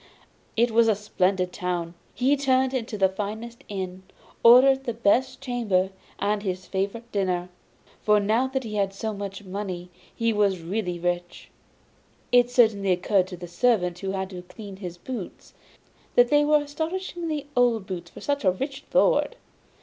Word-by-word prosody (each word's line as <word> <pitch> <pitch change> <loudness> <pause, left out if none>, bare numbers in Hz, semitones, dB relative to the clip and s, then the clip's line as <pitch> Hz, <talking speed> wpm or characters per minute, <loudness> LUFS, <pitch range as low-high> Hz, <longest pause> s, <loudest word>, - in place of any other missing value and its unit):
It 235 +1 +3
was 230 +1 +4
a 220 - +4
splendid 185 -3 0
town! 175 -3 -3 0.2
He 265 +4 +3
turned 265 -2 +2
into 230 -4 -3
the 190 -1 +4
finest 215 +5 -6
inn, 190 -2 -5 0.4
ordered 265 +3 +7
the 235 - -2
best 255 +4 +2
chamber 215 -8 0 0.3
and 210 0 0
his 185 -2 -3
favourite 200 +5 -3
dinner; 180 -3 -1 0.5
for 210 0 +4
now 220 +6 +2
that 265 0 -2
he 220 -2 -6
had 195 -2 0
so 220 +2 -3
much 200 0 -6
money 185 -2 -5 0.2
he 230 -1 +1
was 200 -3 +2
really 180 0 -2
rich. 175 0 -3 0.8
It 245 0 +5
certainly 220 -6 +3
occurred 185 +1 +2
to 185 -1 -8
the 175 0 -8
servant 180 -2 +1
who 195 0 -3
had 190 0 -3
to 180 -1 -7
clean 195 +2 -10
his 180 -3 -7
boots 220 0 -8 0.6
that 245 0 +6
they 295 +1 +5
were 300 0 +4
astonishingly 320 0 -4
old 240 -5 +3
boots 175 -3 -6
for - - -12
such 285 -2 -1
a 190 - +5
rich 270 +9 -4
lord. - - +3
210 Hz, 165 wpm, -25 LUFS, 185-245 Hz, 0.8 s, ordered